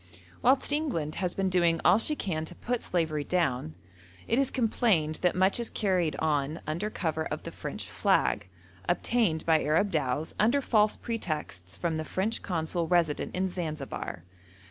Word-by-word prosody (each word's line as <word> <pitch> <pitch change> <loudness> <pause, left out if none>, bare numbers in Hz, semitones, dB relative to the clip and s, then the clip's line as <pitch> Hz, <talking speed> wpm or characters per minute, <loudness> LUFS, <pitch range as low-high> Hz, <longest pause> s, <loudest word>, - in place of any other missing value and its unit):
Whilst 265 +3 +3
England 250 - -1
has 180 -2 -1
been 195 0 0
doing 170 -2 +3
all 180 +5 +6
she 300 +7 +2
can 165 - -2
to 175 - -10
put 245 +5 -2
slavery 160 -4 -1
down, 130 - 0 0.5
it 235 - +2
is 275 - +2
complained 215 - +1
that 180 - +2
much 190 +4 +3
is 235 - -2
carried 185 -6 0
on 150 0 0
under 170 +8 -2
cover 160 -6 -2
of - - -5
the - - -6
French - - -6
flag, 100 -2 +1 0.4
obtained 175 -3 +1
by 160 -1 +4
Arab 165 +7 +2
dhows 150 -1 -1
under 235 +7 +4
false 215 -5 +2
pretexts 150 - -4
from 165 -2 -1
the 155 - -2
French 195 +7 -1
Consul 165 -1 -2
resident 170 -3 +1
in 185 +1 +1
Zanzibar. 155 - -5
175 Hz, 165 wpm, -29 LUFS, 155-210 Hz, 0.5 s, all